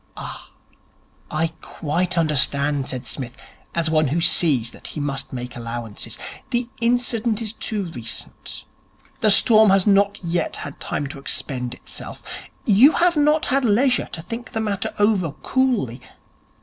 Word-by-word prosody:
'Ah, - - -8 0.8
I 160 +2 0
quite 175 +4 -2
understand,' 145 -3 +2
said 130 -2 -4
Psmith, 125 -3 -4 0.4
as 170 -1 +1
one 155 -1 +3
who 150 +6 0
sees 155 -8 +3
that - - -7
he - - -5
must 135 -2 -2
make 125 -1 -6
allowances. 115 -2 -5 0.3
'The 240 -2 0
incident 235 -2 +1
is 220 -2 -2
too 215 -2 -2
recent. 120 -3 -6 0.5
The 215 - +3
storm 220 +1 +7
has 195 -1 +4
not 200 0 +3
yet 170 -1 -1
had 145 - -7
time 145 - -2
to 140 - -8
expend 125 -3 -2
itself. - - -8 0.4
You 235 +8 +7
have 345 0 +3
not 300 +1 +3
had 275 +1 +1
leisure 245 +3 +2
to 160 - -5
think 230 +6 -7
the 225 - -1
matter 205 -3 -1
over 205 -7 +2
coolly. 230 - 0
175 Hz, 150 wpm, -22 LUFS, 140-225 Hz, 0.8 s, storm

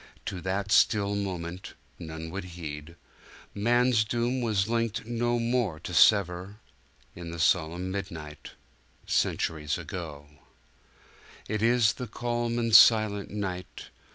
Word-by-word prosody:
To 90 - -5
that 100 +2 -2
still 100 -2 +3
moment, 90 -3 -5 0.2
none 80 0 -7
would 95 +1 -5
heed, 75 0 -7 0.6
Man's 120 +2 +3
doom 120 +4 -1
was 105 -4 0
linked 115 -2 -1
no 120 +1 0
more 115 -8 0
to 90 - -7
sever 95 +1 +3 0.3
— 70 -1 -34
In 85 -1 -8
the 85 - -6
solemn 85 +1 +1
midnight, 80 -6 -7 0.5
Centuries 75 -2 0
ago! 75 -5 -7 1.2
It 105 0 -2
is 115 -1 +4
the 125 - -6
calm 120 +1 -2
and 115 -2 +2
silent 110 -3 +6
night! 95 -3 -6
100 Hz, 125 wpm, -28 LUFS, 85-115 Hz, 1.2 s, silent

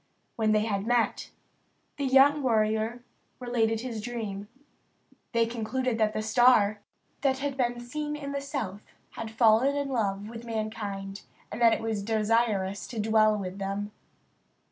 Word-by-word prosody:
When 220 -1 +1
they 215 0 +3
had 200 -1 -2
met, 240 -1 +1 0.7
the 280 - -1
young 275 +3 +5
warrior 220 -1 +1 0.4
related 225 -3 0
his 235 -4 -5
dream. 210 -4 -5 0.8
They 230 -1 +3
concluded 235 +1 -2
that 215 -1 +2
the 215 - -2
star 220 -3 +4 0.4
that 265 -2 +2
had 280 0 -3
been 245 -2 0
seen 295 +5 -4
in 285 -1 -6
the 280 0 -3
south 210 -8 -4 0.3
had 225 -1 -6
fallen 225 +4 +4
in 285 -1 -2
love 205 -5 -1
with 230 +1 -8
mankind, 215 -3 -4 0.3
and 240 - -6
that 230 -1 +6
it - - -2
was 220 -2 -2
desirous 215 -2 0
to 230 - -6
dwell 215 0 +3
with 190 -1 -5
them. 200 +1 -3
225 Hz, 150 wpm, -28 LUFS, 215-245 Hz, 0.8 s, that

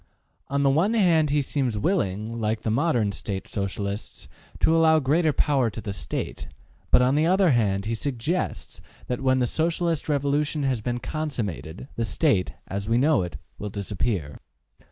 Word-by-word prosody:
On 140 0 0
the 140 - +4
one 185 +11 +2
hand 165 -8 +4
he 145 0 +2
seems 130 -5 -1
willing,, 110 - -1
like 110 0 0
the 110 - -1
modern 120 -5 +2
State 95 0 -5
Socialists, 100 +1 -4 0.3
to 160 - +4
allow 160 -1 +5
great 155 +3 +2
power 135 -6 +3
to 110 - -7
the 105 -2 -5
State, 95 - -5 0.4
but - - +5
on 130 +2 +3
the 155 +3 +3
other 185 -1 +4
hand 100 -5 +1
he 115 - -1
suggests 140 +8 -3 0.2
that 125 +1 -3
when 130 -1 +3
the 125 - +2
Socialist 165 +3 -1
revolution 145 +1 0
has 130 -4 0
been 120 +2 -2
consummated, 120 - -4
the 115 - 0
State, 110 - +1
as 100 +2 -4
we 115 - +3
know 145 0 +3
it, 90 -2 -5 0.2
will 105 - -4
disappear. 100 - -3
125 Hz, 170 wpm, -25 LUFS, 105-155 Hz, 0.4 s, allow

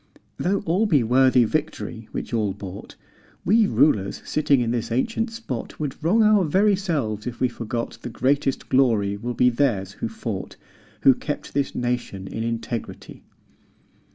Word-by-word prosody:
Though 195 +3 0
all 185 +7 +2
be 145 - +3
worthy 125 +1 +4
Victory 115 -4 -3
which - - -5
all 105 -4 +1
bought, 95 0 -9 0.5
We 215 +3 +4
rulers 100 - +2
sitting 145 -3 +2
in 115 -1 0
this 115 -1 -2
ancient 225 - 0
spot 225 - -6
Would 150 0 -4
wrong 215 +8 +4
our 210 -2 +5
very 195 +6 +3
selves 140 - -2
if 120 - -5
we 130 - +3
forgot 115 0 -5
The - - -5
greatest 135 +3 0
glory 110 -7 +2
will 120 +4 -4
be 125 0 +4
theirs 115 -7 0
who 110 - -4
fought, 110 -3 -5 0.5
Who 135 - +7
kept 145 +3 -5
this 140 -1 -1
nation 120 -6 -2
in 110 - -4
integrity." 115 0 -5
125 Hz, 155 wpm, -23 LUFS, 115-155 Hz, 0.5 s, Who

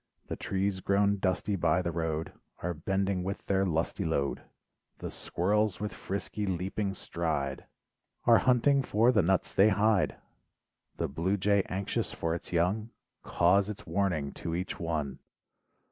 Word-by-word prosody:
The - - -2
trees 95 0 -1
grown 100 +1 +2
dusty 95 +2 0
by 90 0 +2
the 85 - -1
road, 80 -1 -2 0.3
Are 90 +1 -1
bending 95 +3 -1
with 95 +2 -4
their 95 0 +2
lusty 85 +4 -1
load. 70 -4 -1 0.6
The - - -6
squirrels 105 +2 0
with 105 0 -3
frisky 100 +1 -4
leaping 95 +2 -2
stride, 75 -7 -2
38 - - -19
LIFE - - -26
WAVES - - -35
Are 115 -1 +8
hunting 130 +2 +4
for 115 -1 +3
the 110 -5 +4
nuts 95 +2 +1
they 100 +3 +6
hide. 105 0 +2 0.8
The - - 0
blue 85 +8 0
jay 100 +1 +3
anxious 95 +1 -2
for 80 0 -1
its 85 - -5
young, 95 +6 +1 0.3
Caws 95 +4 +3
its 105 - -7
warning 85 -8 0
to 85 - -4
each 90 +2 -4
one. 75 -5 -2
95 Hz, 160 wpm, -30 LUFS, 85-100 Hz, 0.8 s, Are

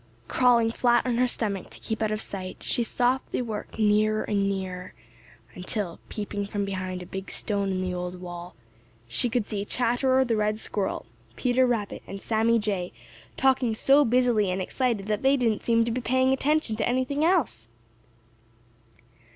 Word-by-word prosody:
Crawling 235 - +4
flat 240 +1 +3
on 245 -2 0
her 250 +1 +3
stomach 205 -6 -3
to - - -14
keep 220 0 -4
out 215 - +1
of 215 0 -2
sight, 185 -2 -6
she 240 - +1
softly 250 +3 0
worked 220 -4 -5
nearer 215 0 +3
and 200 -2 0
nearer 185 -2 -4 0.6
until, 180 -1 -3
peeping 205 -1 -4
from 205 0 -2
behind 185 -2 -4
a - - -10
big 190 +2 -6
stone 200 -2 -1
in 185 -1 -1
the 185 -1 -2
old 180 0 -4
wall, 175 0 -8 0.5
she 120 - +1
could 240 -2 0
see 205 -2 -3
Chatterer 255 +4 +2
the 235 -2 +1
Red 215 0 +1
Squirrel, 205 -3 -3 0.3
Peter 255 +1 +2
Rabbit, 225 -4 -2
and 195 - -6
Sammy 225 +2 +2
Jay 200 -5 -1 0.5
talking 260 -4 +2
so 275 +5 +5
busily 240 -5 +3
and 185 - -1
so 190 - -1
excited 235 -3 -1
that 210 0 -1
they 270 +1 +4
didn't 230 -4 +1
seem 230 -1 +3
to 235 - -1
be 250 +2 -2
paying 260 +2 +2
attention 285 -3 +1
to 215 - 0
anything 260 +4 0
else. 325 - +1
220 Hz, 175 wpm, -26 LUFS, 195-245 Hz, 0.6 s, so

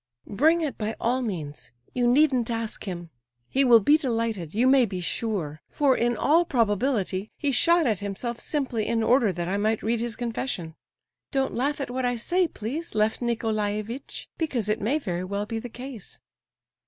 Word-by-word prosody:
"Bring 315 +11 +3
it 300 -4 -3
by 220 0 -2
all 250 +3 +1
means; 165 - -5 0.2
you 245 -1 +2
needn't 255 -2 +3
ask 230 -1 -3
him. 175 -4 -6 0.4
He 275 - +4
will 240 -3 +7
be 290 +9 +4
delighted, 225 - -2
you 235 +3 +3
may 265 -1 +6
be 190 -2 -4
sure; 175 -5 -2
for, 280 -3 +3
in 240 -1 +1
all 320 +9 +4
probability, 215 - 0
he 290 -2 0
shot 335 +5 +4
at 215 -6 +1
himself 205 +4 -4
simply 255 -7 -1
in 230 -1 +1
order 235 -2 +4
that 175 -1 -4
I 195 +2 0
might 215 +2 0
read 230 +1 +1
his 235 -1 -2
confession. 230 -8 -3 0.6
Don't 270 -2 0
laugh 285 +5 0
at 275 - -3
what 260 +1 -2
I 245 0 +1
say, 355 +10 +1
please, 285 +5 -5
Lef 215 +1 +2
Nicolaievitch, 220 +1 -2
because 255 - -1
it 215 - 0
may 240 +9 +1
very 180 - -3
well 200 +2 -3
be 225 +1 -3
the 245 - -7
case." 245 -3 -9
230 Hz, 180 wpm, -26 LUFS, 205-265 Hz, 0.6 s, will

